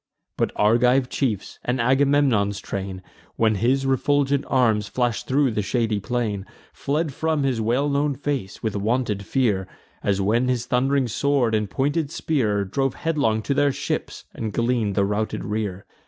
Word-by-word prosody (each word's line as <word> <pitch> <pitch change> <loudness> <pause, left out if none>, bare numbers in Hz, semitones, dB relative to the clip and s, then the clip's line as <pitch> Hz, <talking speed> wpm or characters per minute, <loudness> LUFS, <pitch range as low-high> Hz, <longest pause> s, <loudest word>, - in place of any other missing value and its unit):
But - - 0
Argive 125 +4 +3
chiefs, 110 -8 -2
and 125 +1 -1
Agamemnon's 130 -5 +2
train, 95 -1 -5 0.3
When 110 -1 +3
his 125 +6 +1
refulgent 140 +1 +2
arms 110 -6 +2
flash'd 120 -1 -1
thro' 135 -1 +2
the 105 - -1
shady 110 +1 0
plain, 105 -2 -2 0.3
Fled 150 +1 -1
from 160 0 0
his 130 -4 0
well 120 +6 +1
known 140 0 +1
face, 135 -8 -4
with 110 -2 -1
wonted 105 0 0
fear, 105 -6 0 0.3
As 100 -1 0
when 115 +6 +2
his 125 -2 0
thund'ring 130 +1 +1
sword 125 0 +1
and 105 -2 0
pointed 145 - 0
spear 125 -11 0
Drove 135 +6 -1
headlong 140 -10 0
to 140 - 0
their 145 0 +3
ships, - - -4
and 110 -2 -4
glean'd 115 -3 0
the 100 - +3
routed 105 +2 -2
rear. 105 -3 -3
120 Hz, 155 wpm, -23 LUFS, 105-135 Hz, 0.3 s, Argive